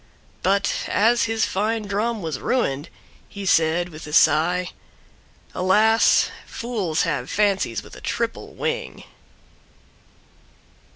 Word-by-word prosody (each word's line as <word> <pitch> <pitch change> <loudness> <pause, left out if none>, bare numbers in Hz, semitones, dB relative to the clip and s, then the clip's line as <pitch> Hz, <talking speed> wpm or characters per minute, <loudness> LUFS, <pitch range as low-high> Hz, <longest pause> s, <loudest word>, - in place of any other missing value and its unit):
But 200 +2 0
as 230 +3 +3
his 225 -1 0
fine 215 +3 -1
Drum 210 +1 -2
was 155 -5 -3
ruined, 145 - -1 0.4
he 200 -1 -7
said, 170 0 +2
with 155 -2 -10
a 150 - -8
sigh, 170 +4 +3 0.8
"Alas! 215 +5 +3 0.2
Fools 205 -10 -2
have 150 -5 -2
fancies 195 - 0
with - - -13
a - - -12
triple - - -3
wing!" - - -4
190 Hz, 110 wpm, -22 LUFS, 160-220 Hz, 0.8 s, as